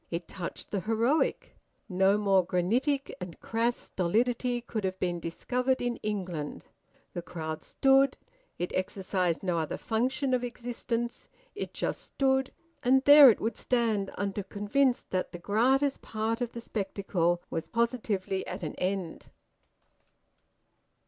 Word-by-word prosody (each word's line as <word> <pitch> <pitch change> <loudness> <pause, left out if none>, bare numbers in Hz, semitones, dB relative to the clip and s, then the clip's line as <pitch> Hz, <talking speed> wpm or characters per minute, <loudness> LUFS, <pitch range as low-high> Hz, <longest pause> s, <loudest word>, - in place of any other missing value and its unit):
It 170 0 -4
touched 180 -3 -6
the 200 - 0
heroic. 230 - 0 0.3
No 190 0 +3
more 195 -3 +3
granitic 245 - 0
and 180 -2 -7
crass 230 +1 0
stolidity 240 +6 0
could 225 -3 -4
have 190 0 -2
been 175 -1 -1
discovered 250 +10 -1
in 245 -1 -1
England. 180 -8 -4 0.5
The 175 - -3
crowd 160 -2 -5
stood; 270 0 +3 0.4
it 175 - -3
exercised 185 -2 -1
no 175 -3 0
other 160 - -2
function 255 +4 0
of 250 -1 +1
existence. 240 -1 -4 0.2
It - - -6
just - - -2
stood, 265 -1 +1 0.3
and 265 +2 +4
there 285 -1 +10
it 225 - +3
would 225 0 -2
stand 225 -5 +1
until 200 0 -2
convinced 245 +6 0
that 185 -1 -1
the - - -5
gratis 260 +9 +2
part 225 +2 -2
of 240 -1 -2
the 235 - -6
spectacle 190 -5 -1
was 165 - -3
positively 220 -5 -1
at 185 +1 -6
an 155 - -3
end. 185 -2 -3
215 Hz, 135 wpm, -29 LUFS, 185-245 Hz, 0.5 s, there